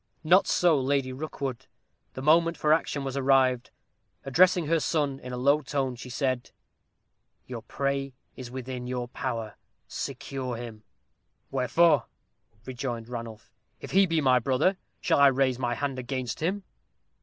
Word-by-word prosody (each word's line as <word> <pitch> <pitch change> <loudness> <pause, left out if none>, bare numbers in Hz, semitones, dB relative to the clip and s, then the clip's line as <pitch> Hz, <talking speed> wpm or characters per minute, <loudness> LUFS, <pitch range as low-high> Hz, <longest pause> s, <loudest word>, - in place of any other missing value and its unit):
Not 180 +5 +5
so 165 -6 +3
Lady 135 -1 0
Rookwood. 135 -3 -5 0.5
The 130 - -7
moment 165 +2 +4
for 150 0 +3
action 150 -3 0
was 135 -1 -4
arrived. 130 -2 +3 0.6
Addressing 175 +5 +4
her 165 +2 +2
son 145 -4 0
in 125 - -8
a 125 - -4
low 140 +4 +3
tone, 135 -4 -2
she 125 +1 -9
said, 130 -1 -1 1.0
"Your 120 -3 -7
prey 140 +2 -2 0.2
is 125 -2 -8
within 125 -1 -6
your 125 -1 -3
power. 115 -5 -4 0.3
Secure 130 -3 -5
him." 115 -2 -8 0.7
"Wherefore?" 140 +1 +3 0.6
rejoined 120 -3 -5
Ranulph; 115 -2 -8 0.3
"if - - -9
he 195 +1 +5
be 165 -2 +1
my 130 -2 +4
brother, 135 - +2 0.3
shall - - +2
I 140 - +8
raise 130 -2 +2
my 120 -2 -1
hand 135 -2 -3
against 130 -1 -4
him?" 190 +5 -1
135 Hz, 145 wpm, -27 LUFS, 125-145 Hz, 1.0 s, I